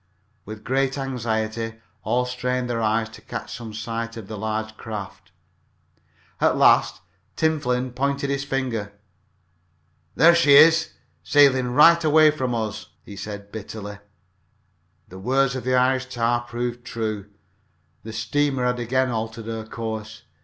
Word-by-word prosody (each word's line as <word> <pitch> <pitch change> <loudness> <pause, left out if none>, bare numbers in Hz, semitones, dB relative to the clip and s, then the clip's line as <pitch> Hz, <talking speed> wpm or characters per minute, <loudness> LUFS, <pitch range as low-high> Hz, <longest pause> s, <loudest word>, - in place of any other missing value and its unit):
With 110 +1 -9
great 135 +1 0
anxiety 115 -4 -3 0.3
all 125 +1 0
strained 125 0 -2
their 120 -1 -2
eyes 110 +1 +1
to 110 - -14
catch - - -7
some 115 -2 -8
sight 115 +1 -5
of 110 -4 -8
the 110 - -6
large 110 +1 -3
craft. 105 -4 -8 1.1
At - - +2
last - - +4 0.3
Tim 160 -1 +1
Flynn 125 -2 -1
pointed 140 +2 -1
with 140 - 0
his - - -3
finger. 125 -7 -3 1.2
"There 170 +3 +7
she 160 -5 +5
is 160 +2 +6 0.3
sailin' 130 -4 +4
right 170 +3 +7
away 155 0 +6
from 130 -5 -2
us!" 110 -1 -4 0.2
he 100 - -10
said 100 0 -8
bitterly. 105 -1 -7 1.1
The 95 - -11
words 135 +5 +1
of 130 - -5
the 130 0 +2
Irish 130 +1 +2
tar 120 -1 0
proved 120 0 -4
true 110 -4 -4 0.7
the 110 - -8
steamer 135 +4 0
had 125 0 0
again 130 +2 0
altered 115 0 -4
her 110 -1 -5
course. 110 -1 -6
120 Hz, 145 wpm, -23 LUFS, 110-130 Hz, 1.2 s, There